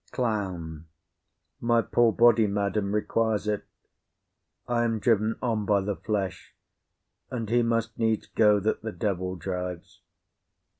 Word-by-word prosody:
CLOWN. 95 - -3 0.7
My 115 -1 +2
poor 115 +2 +3
body, 115 -1 +5
madam, 100 0 -1
requires 105 0 0
it; 105 -1 -1 1.0
I 120 -1 +1
am 115 -1 0
driven 110 0 +1
on 110 -4 0
by 100 -1 +3
the 100 +1 -2
flesh, 95 -4 -4 0.7
and 115 -3 -4
he 120 0 +4
must 115 -1 -1
needs 110 -1 +1
go 105 -2 +3
that 110 +3 -1
the 110 - -4
devil 95 -1 -2
drives. 90 -1 -6
105 Hz, 130 wpm, -27 LUFS, 100-115 Hz, 1.0 s, body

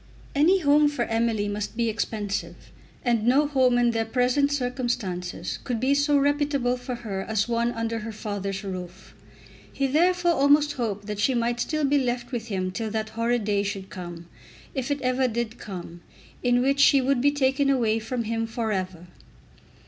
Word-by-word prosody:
Any 345 +7 +4
home 295 0 +5
for 290 -5 -1
Emily 225 -2 0
must 205 +2 -4
be 235 -1 +1
expensive; 210 -2 -3 0.5
and 235 -3 +2
no 275 +4 +5
home 260 -4 +3
in 240 -1 +3
their 225 -1 0
present 250 +5 +1
circumstances 245 -9 -3
could 245 -3 -2
be 260 +4 +2
so 285 +1 +3
reputable 285 -3 +1
for 250 0 -5
her 195 -3 -3
as 215 +2 -1
one 235 0 +1
under 230 0 -2
her 225 +1 -6
father's 205 -2 -4
roof. 185 -1 -7 0.6
He 275 - -1
therefore 345 +5 +3
almost 290 0 +4
hoped 210 -5 -3
that 210 -1 -5
she 255 +5 +2
might 235 0 0
still 305 +4 0
be 285 +1 +3
left 245 -1 -2
with 235 -3 -4
him 185 -3 -2
till 220 +3 -3
that 220 0 -3
horrid 230 +1 0
day 205 -1 +1
should 195 -1 -5
come, 175 -2 -8 0.5
if 265 -2 -3
it 285 -1 -1
ever 255 +1 +2
did 235 -1 -3
come, 175 -3 -8 0.4
in 245 0 +2
which 275 +1 +1
she 280 0 +6
would 265 -1 +1
be 285 - +5
taken 275 -1 +1
away 230 -5 +2
from 235 +2 -3
him 225 0 -2
for 225 -1 -2
ever. 185 -3 -3
240 Hz, 180 wpm, -25 LUFS, 210-275 Hz, 0.6 s, she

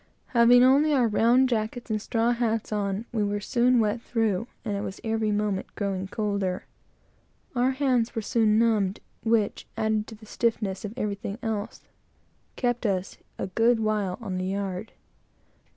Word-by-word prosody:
Having 245 0 +6
only 285 +4 +5
our 250 -3 +3
round 235 +4 +4
jackets 230 0 -2
and 215 -1 0
straw 230 +2 +1
hats 230 -2 -1
on, 205 +1 -1
we 220 -3 0
were 205 0 -1
soon 245 +3 +2
wet 220 +1 +1
through, 225 -3 0 0.2
and 205 -2 -1
it 200 - -2
was 195 -1 -6
every 220 -1 0
moment 205 -2 -1
growing 195 -2 -2
colder. 200 -3 -2 0.9
Our 250 +1 +3
hands 260 -4 +1
were 225 - -2
soon 215 -1 +2
stiffened - - +4
and 230 - +4
numbed, 200 -2 -1 0.2
which, 225 -2 0
added 220 -1 0
to 225 - -9
the 215 +1 -15
stiffness 215 -3 -1
of 210 +1 -6
everything 205 -2 -3
else, 220 -2 -3 0.7
kept 245 -2 0
us 190 -1 -2 0.2
a - - -2
good 225 +5 +2
while 210 -4 0
on 190 -4 -3
the 185 - -2
yard. 195 +1 -3
220 Hz, 170 wpm, -26 LUFS, 200-235 Hz, 0.9 s, Having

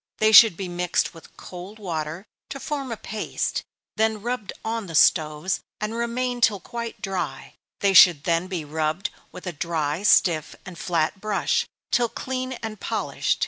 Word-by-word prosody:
They 215 0 +4
should 220 -4 +9
be 195 - -4
mixed 175 +1 -1
with 165 - -16
cold 185 +4 -9
water, 165 -2 -4 0.2
to 275 - -6
form 275 -3 -4
a 230 - -3
paste, 215 0 -3 0.4
then 220 -1 +1
rubbed 240 -4 -3
on 225 -2 -2
the 165 - -6
stoves, 155 +3 +3 0.2
and 215 +1 -3
remain 240 +1 -2
till 210 -4 +4
quite 235 +5 -7
dry 195 -2 -4 0.3
they 200 -1 +3
should 175 -6 +8
then 170 0 +1
be 180 -5 -4
rubbed 155 +6 -2 0.2
with 180 - -10
a 180 - -4
dry, 155 0 -2
stiff, 170 -6 +3
and 180 - -9
flat 170 +2 -1
brush, 215 -2 0 0.2
till 240 -1 +2
clean 255 +1 -4
and 215 -2 -5
polished. - - -1
195 Hz, 165 wpm, -24 LUFS, 170-225 Hz, 0.4 s, should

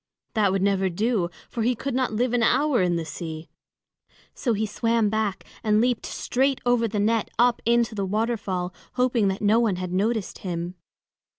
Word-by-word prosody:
That 210 -4 +3
would 195 0 0
never 195 -1 +2
do, 200 0 0 0.2
for 235 - -4
he 245 +3 +2
could 270 +3 -4
not 255 -1 0
live 240 +3 0
an 245 - +2
hour 260 +1 +3
in 175 -1 +2
the 165 -1 -2
sea. 160 0 -7 0.8
So 240 - -1
he 215 +1 0
swam 225 0 +1
back 215 -3 -1 0.2
and 215 -1 +3
leaped 245 0 +1
straight 265 +1 0
over 245 -1 +3
the 210 -1 -2
net 220 +2 +1
up 240 +1 +3
into 235 -1 +3
the 200 -2 -2
waterfall, 205 -4 -1 0.2
hoping 250 -4 +2
that 195 +2 -2
no 215 +3 +4
one 225 -5 +2
had 180 0 -4
noticed 215 +2 -1
him. 175 -1 -4
220 Hz, 185 wpm, -25 LUFS, 195-240 Hz, 0.8 s, no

